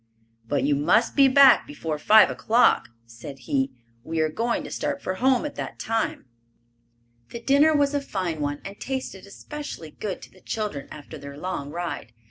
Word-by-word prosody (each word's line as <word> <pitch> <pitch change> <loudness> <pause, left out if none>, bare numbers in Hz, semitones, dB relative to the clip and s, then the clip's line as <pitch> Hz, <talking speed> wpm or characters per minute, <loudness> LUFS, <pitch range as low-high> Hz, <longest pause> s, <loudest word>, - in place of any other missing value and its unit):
"But 140 +1 0
you 145 +1 +2
must 145 +5 +2
be 275 -1 +7
back 270 0 +6
before 165 - -4
five 215 +6 +6
o'clock," 235 +3 +3 0.2
said 115 +4 -10
he. 135 0 0 0.3
"We 165 0 -3
are 155 0 +2
going 230 +9 -1
to - - -8
start - - -2
for 185 - -3
home 255 +6 +2
at 295 - -4
that - - -5
time." 225 -8 -2 1.0
The 235 - -7
dinner 285 +5 +4
was 285 0 +2
a 285 - 0
fine 185 - -3
one 145 0 -2
and 200 +1 -8
tasted 260 -8 -5
especially 285 - -8
good 195 +2 -5
to - - -13
the 185 - -21
children 210 -11 -4
after 150 +1 -10
their 140 0 -9
long 155 -4 -4
ride. 155 -8 -5
185 Hz, 180 wpm, -25 LUFS, -, 1.0 s, be